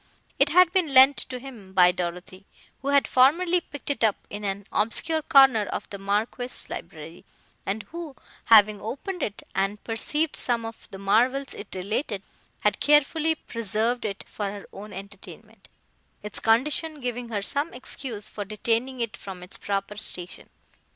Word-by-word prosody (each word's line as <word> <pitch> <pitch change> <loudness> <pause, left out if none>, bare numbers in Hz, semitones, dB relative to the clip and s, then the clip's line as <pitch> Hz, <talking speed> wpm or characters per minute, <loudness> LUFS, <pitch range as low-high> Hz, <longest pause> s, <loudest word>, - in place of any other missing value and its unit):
It 275 +1 +5
had 355 +2 +6
been 345 -7 +1
lent 265 +2 +8
to 255 - -2
him 240 -7 -11
by 180 -1 +6
Dorothée, 180 +2 -5 0.4
who 275 - -6
had 280 0 +4
formerly 340 +8 +4
picked 290 -2 -6
it 260 -5 -2
up 215 -3 +4 0.2
in 205 +1 -6
an 200 0 -3
obscure 315 +9 0
corner 270 -8 +6
of - - -4
the 200 - -6
Marquis's 215 +5 -2
library, 160 +3 -8 0.4
and 205 +2 -2
who, 335 -4 -7 0.3
having 215 -2 +6
opened 345 - -5
it 210 -6 -3
and 195 +2 -1
perceived 295 +7 -1
some 235 -2 0
of 225 0 -9
the 195 - -8
marvels 245 +8 +2
it 205 - -8
related, 200 +2 -2 0.4
had 210 -1 +1
carefully 300 +2 +3
preserved 230 -1 -2
it 200 -2 -4
for 210 - -4
her 200 0 -7
own 210 +2 -9
entertainment, 195 +1 -12 0.6
its 210 - -5
condition 295 +7 +2
giving 245 -2 -4
her 205 -3 -2
some 285 +9 -1
excuse 245 -4 -7
for 205 - -5
detaining 230 +5 -1
it 230 -1 -2
from 190 -4 -9
its 180 - -1
proper 200 +1 -3
station. 180 -4 -5
225 Hz, 160 wpm, -26 LUFS, 200-275 Hz, 0.6 s, lent